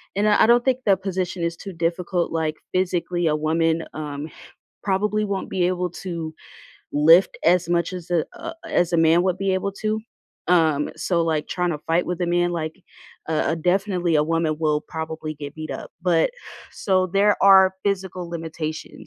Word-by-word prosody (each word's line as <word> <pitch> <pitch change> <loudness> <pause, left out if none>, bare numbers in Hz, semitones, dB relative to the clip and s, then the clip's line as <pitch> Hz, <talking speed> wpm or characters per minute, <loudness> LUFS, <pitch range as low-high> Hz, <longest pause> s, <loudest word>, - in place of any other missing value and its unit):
and, 205 +2 +2
uh, 210 - +4
I - - +7
don't 240 +1 +5
think 260 -1 +1
the 200 - +5
position 185 -2 -3
is 170 0 -2
too 195 -2 -8
difficult, 170 +1 -1
like, 160 -1 -1 0.2
physically 175 -1 0
a 150 - +2
woman, 160 +1 +1
um, 150 0 -5 0.5
probably 210 +2 0
won't 200 -2 -3
be 180 -2 +1
able 180 0 -1
to 170 -3 -6 0.6
lift 165 +5 +5
as 175 0 +3
much 170 0 0
as 180 -1 -8
a 170 -3 +2
a 330 - -7
as 175 0 0
a - - +4
man 165 +1 +4
would 185 -1 0
be 195 -1 +1
able 195 +1 -2
to, 215 +2 -2 0.5
um, 160 -4 +3
so, 170 -2 0
like, 160 -2 -1
tryna 180 -1 -1
to 150 - -5
fight 165 +2 +2
with 180 0 -3
a 175 - +1
man, 175 0 +1
like, 160 +2 -4 0.5
a 160 0 +1
a - - -1
definitely 180 0 +1
a 150 - +4
woman 165 -1 0
will 150 -2 +1
probably 160 -1 -5
get 145 -1 -8
beat 155 -1 -7
up, - - -6
but 170 -3 +3 0.4
so, 185 -2 +1
there 200 +3 +3
are 190 -1 +7
physical 185 -3 -2
limitations 160 -2 -6
175 Hz, 185 wpm, -23 LUFS, 160-190 Hz, 0.6 s, I